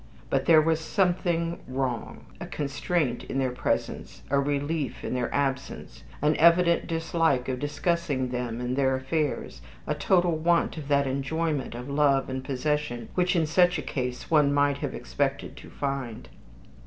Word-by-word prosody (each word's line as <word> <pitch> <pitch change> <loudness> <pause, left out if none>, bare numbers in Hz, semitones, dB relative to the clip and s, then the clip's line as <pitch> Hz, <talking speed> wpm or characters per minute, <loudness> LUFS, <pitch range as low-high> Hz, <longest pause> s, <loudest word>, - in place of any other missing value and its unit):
But - - +1
there 155 -2 +6
was 160 0 +2
something 170 -1 0
wrong. 130 -2 -3
A - - -6
constraint 145 -2 -1
in - - -4
their 130 -2 +1
presence, 100 -5 -3
a 140 - +4
relief 145 -1 -2
in - - -3
their 125 -1 -1
absence, 135 -2 -3 0.2
an 150 +1 +3
evident 170 +1 +4
dislike 165 -5 +1
of 130 -1 -2
discussing 145 -2 -1
them 125 -2 -3
and 125 +1 -2
their 135 -1 +2
affairs, 130 - -2 0.2
a - - 0
total 175 +3 +2
want 170 +2 +2
of 155 -4 -7
that 140 -1 +3
enjoyment 140 +1 -2
of 125 +2 -6
love 140 -2 +2
and 130 0 -3
possession 135 -3 -2
which 180 +1 +1
in 165 -2 +3
such 180 +3 +3
a 150 - -4
case 125 0 -4
one 150 -3 +5
might 145 0 +2
have - - -3
expected 140 -1 -2
to - - -11
find. 135 -5 -4
145 Hz, 160 wpm, -27 LUFS, 130-165 Hz, 0.2 s, there